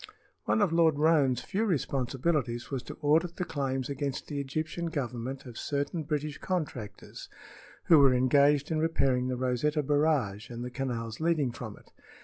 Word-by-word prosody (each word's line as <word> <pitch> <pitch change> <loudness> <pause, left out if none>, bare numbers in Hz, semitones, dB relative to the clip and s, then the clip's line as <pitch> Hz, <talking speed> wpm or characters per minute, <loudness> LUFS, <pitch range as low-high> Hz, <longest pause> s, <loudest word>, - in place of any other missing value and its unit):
One 215 - +3
of 175 -5 +1
Lord 165 -3 +4
Roane's 145 -5 +3
few 205 +3 -1
responsibilities 135 - -1
was 135 -2 -2
to - - -8
audit 165 +4 +3
the 180 - -2
claims 135 -4 -2
against 140 -1 -3
the 145 -2 -4
Egyptian 155 +5 -3
Government 130 -4 -4
of 120 -2 -8
certain 145 +3 -2
British 150 -1 -3
contractors 130 - -5 0.5
who 165 -3 +6
were 140 -2 +7
engaged 140 +4 +3
in 155 - +1
repairing 135 -6 +1
the 130 -1 -2
Rosetta 130 +4 0
Barrage 145 -8 +1
and 120 0 -6
the 125 - -6
canals 120 -4 -4
leading 160 -5 +1
from 110 -3 -8
it. - - -20
140 Hz, 160 wpm, -29 LUFS, 125-155 Hz, 0.5 s, were